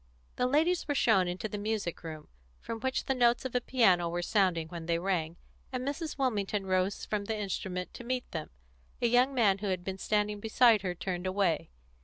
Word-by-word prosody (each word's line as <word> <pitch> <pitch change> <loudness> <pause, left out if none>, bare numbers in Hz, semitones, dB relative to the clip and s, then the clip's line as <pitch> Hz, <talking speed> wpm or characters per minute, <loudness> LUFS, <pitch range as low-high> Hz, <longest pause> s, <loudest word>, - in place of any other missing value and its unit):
The 250 - +1
ladies 320 +7 +2
were 290 - 0
shown 195 -8 +4
into 180 +4 -3
the 210 0 -5
music 210 -4 -2
room, 155 -2 -7 0.3
from 230 - -6
which 260 +3 -1
the 270 - +1
notes 240 -1 +3
of 260 - -3
a 250 - +1
piano 190 -10 +3
were 175 +1 -2
sounding 180 -4 +2
when 165 -1 -7
they 170 -1 +2
rang, 170 -2 -1 0.3
and 255 0 -3
Mrs. 305 +2 -3
Wilmington 210 -6 0
rose 185 +1 0
from 210 -1 -2
the 220 +1 -2
instrument 190 -2 -3
to - - -9
meet 250 +1 -3
them. 160 -2 -4 0.5
A - - 0
young 245 +3 +4
man 200 -5 +3
who 205 - -3
had 185 -2 -1
been 190 +1 -5
standing 210 +1 0
beside 220 0 +4
her 180 -2 -3
turned 180 +1 -3
away. 185 - 0
205 Hz, 205 wpm, -30 LUFS, 180-245 Hz, 0.5 s, shown